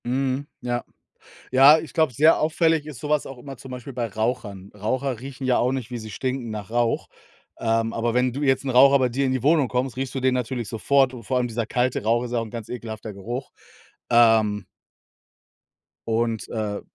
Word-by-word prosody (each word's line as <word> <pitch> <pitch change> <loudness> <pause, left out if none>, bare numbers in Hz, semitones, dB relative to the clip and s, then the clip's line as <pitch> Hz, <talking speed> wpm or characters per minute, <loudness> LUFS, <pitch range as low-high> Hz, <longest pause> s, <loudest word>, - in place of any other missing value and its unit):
Mhm, 130 +2 -1
ja. 120 -1 -2 0.7
Ja, 135 +4 +8
ich 155 -1 -9
glaube, 160 -5 +2
sehr 155 +7 +5
auffällig 160 0 +2
ist 150 -5 -9
so 150 - -6
was 150 -1 +1
auch 135 - -9
immer 135 +1 -9
zum 130 +2 -11
Beispiel 125 +2 -7
bei 120 -1 -2
Rauchern. 105 -3 -3
Raucher 125 +4 -2
riechen 135 +1 -7
ja 130 -1 +3
auch 125 - +2
nicht, 130 -3 -4
wie 120 - -3
sie 110 -1 -8
stinken 130 -2 -3
nach 105 -2 -6
Rauch. 120 0 0 0.5
Ähm, 115 0 0
aber 115 0 -1
wenn 125 +1 +2
du 135 +4 -5
jetzt 135 -1 +2
'n 135 - -3
Raucher 135 +2 +6
bei 130 -1 +2
dir 135 +3 0
in 130 - +1
die 130 -2 -2
Wohnung 150 -2 +4
kommst, 125 +1 -2
riechst 135 0 -3
du - - 0
den 130 0 +2
natürlich 125 -2 -3
sofort 130 +3 +2
und 120 -2 -9
vor 130 +4 -1
allem 125 -1 +1
dieser 115 -1 -3
kalte 125 -1 0
Rauch 115 +2 +2
ist 120 - -6
ja 120 - +1
auch - - -2
'n 110 - -11
ganz 115 -2 -7
ekelhafter 110 -3 -6
Geruch. 120 +7 -6 0.6
Ähm. 110 -4 +4 1.4
Und, 115 -1 -1
äh. 105 -2 -3
125 Hz, 210 wpm, -24 LUFS, 115-135 Hz, 1.4 s, Ja